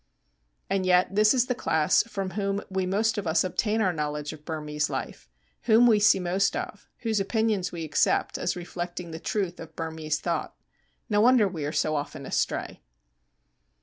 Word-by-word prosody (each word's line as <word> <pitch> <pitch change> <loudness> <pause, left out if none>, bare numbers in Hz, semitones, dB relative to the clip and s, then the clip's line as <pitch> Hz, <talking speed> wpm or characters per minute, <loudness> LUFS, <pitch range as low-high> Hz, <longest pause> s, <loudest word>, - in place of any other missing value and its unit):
And 195 -1 0
yet 180 +1 +3
this 210 +1 +5
is 250 -2 +3
the 250 - 0
class 160 -10 +2
from 195 -4 -5
whom 200 +1 -1
we 190 -1 -1
most 215 +3 +1
of 195 - -5
us 160 0 +3
obtain 210 +4 0
our 185 -4 +2
knowledge 150 -1 -3
of 150 -1 -13
Burmese 150 -2 -2
life, - - -6 0.4
whom 225 +2 +6
we 225 -3 +5
see 205 -2 +5
most 185 +2 +1
of, - - -6
whose 225 -3 0
opinions 210 -2 0
we 170 -2 -5
accept 150 -2 +1
as - - -1
reflecting 175 -1 -6
the 160 - -6
truth 185 -2 -2
of 160 -1 -10
Burmese 160 -2 -3
thought. 170 - -3 0.5
No 210 -2 +2
wonder 240 -2 +5
we 165 -6 -4
are 150 - -2
so 155 0 0
often 145 -1 -4
astray. - - -2
185 Hz, 180 wpm, -26 LUFS, 160-210 Hz, 0.5 s, whom